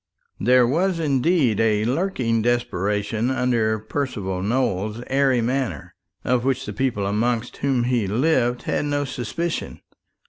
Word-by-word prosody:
There 125 +3 +5
was 170 +8 +1
indeed 145 - +2
a 110 -1 +2
lurking 125 -5 0
desperation 105 -1 0
under 120 -4 +1
Percival 110 -5 -3
Nowell's 110 0 -1
airy 135 -2 +2
manner, 120 - -2 0.3
of 125 -1 +1
which 135 -1 0
the - - -5
people 125 -7 -1
amongst 115 +3 -1
whom 135 -3 +1
he 120 -4 0
lived 120 +2 +1
had - - -1
no 145 0 0
suspicion. 145 +6 -4
120 Hz, 130 wpm, -22 LUFS, 110-135 Hz, 0.3 s, There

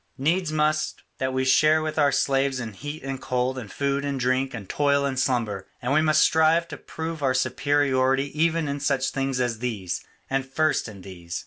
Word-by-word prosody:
Needs 160 +4 +1
must 155 0 0 0.2
that 130 0 0
we 130 0 0
share 155 +4 +5
with 155 0 -2
our 145 -1 +4
slaves 135 -1 +1
in 110 -3 -5
heat 145 +8 -7
and 135 -1 -5
cold 125 +1 -1
and 110 -5 -9
food 140 0 -1
and 140 -1 -2
drink 130 +2 +1
and 110 -6 -7
toil 140 +2 +2
and 135 -2 -1
slumber, 115 -7 -1
and 125 +3 -1
we 155 - +4
must 155 -1 +3
strive 160 +1 +4
to - - -7
prove 160 -1 -6
our 130 -2 +1
superiority 135 +1 +1
even 165 0 +1
in 140 0 -3
such 140 -2 0
things 135 -1 -1
as 120 -3 -1
these, 100 -8 -3 0.2
and 135 0 0
first 155 +3 0
in 100 -4 -11
these. 85 -3 -7
135 Hz, 200 wpm, -25 LUFS, 130-150 Hz, 0.2 s, share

